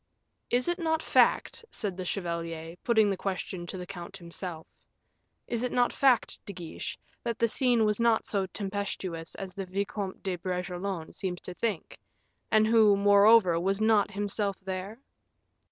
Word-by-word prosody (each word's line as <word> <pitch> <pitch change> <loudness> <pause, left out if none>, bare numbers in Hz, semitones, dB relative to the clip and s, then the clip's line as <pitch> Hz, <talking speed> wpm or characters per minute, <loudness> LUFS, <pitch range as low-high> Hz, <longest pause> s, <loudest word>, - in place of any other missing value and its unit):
"Is 245 +4 +1
it 350 +1 0
not 320 -1 0
fact," 470 - +3
said 200 -4 -3
the 185 0 -5
chevalier, 170 -3 -4
putting 220 -4 +4
the - - 0
question 185 -2 -4
to 185 - -5
the 180 - -6
count 175 -1 -8
himself, 170 -1 -7 0.8
"is 235 -1 -2
it 250 - -1
not 245 -1 +2
fact, 265 -4 +2
De 200 - -5
Guiche, 175 -3 -6 0.3
that 235 -1 -2
the 230 - +3
scene 240 -1 +3
was 210 +1 +1
not 230 -1 +3
so 195 -2 0
tempestuous 190 -4 -4
as 190 -1 -6
the 195 -1 -5
Vicomte 195 +1 -3
de 185 -2 -2
Bragelonne 180 -1 -4
seems 180 -2 -3
to 180 - -7
think, 210 -2 -3 0.5
and 215 0 +5
who, 215 -2 +5
moreover, 200 -2 +6
was 195 +3 0
not 215 -2 +4
himself 200 0 -2
there?" 190 +3 -5
200 Hz, 160 wpm, -29 LUFS, 180-220 Hz, 0.8 s, moreover